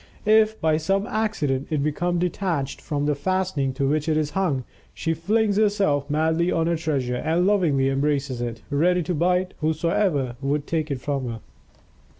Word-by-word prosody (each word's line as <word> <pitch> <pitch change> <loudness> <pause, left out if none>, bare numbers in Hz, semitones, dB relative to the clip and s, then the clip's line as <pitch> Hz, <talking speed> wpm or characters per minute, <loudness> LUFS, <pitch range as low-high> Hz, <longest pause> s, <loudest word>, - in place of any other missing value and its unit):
If, 220 0 +4
by 155 -1 +2
some 195 +6 0
accident, 165 -13 -1
it 150 -3 0
become 175 +4 0
detached 170 -5 -2
from 145 -2 -2
the 150 - +2
fastening 155 -2 -1
to 135 +1 -1
which 150 +2 0
it 155 - +2
is 150 -1 0
hung, 155 -7 0 0.3
she 165 - -1
flings 205 +5 +1
herself 200 -10 +2
madly 160 +3 +1
on 165 -1 +1
her 170 0 +1
treasure 140 -6 -1
and 165 +6 +1
lovingly 170 -10 +2
embraces 135 -2 0
it, 115 -2 -5
ready 175 +5 +2
to 180 - -2
bite 180 +3 +1
whoso 155 - 0
would 140 +1 -1
take 160 -1 -2
it 135 -3 -3
from 135 -3 -2
her. 115 -1 -5
155 Hz, 170 wpm, -24 LUFS, 140-180 Hz, 0.3 s, If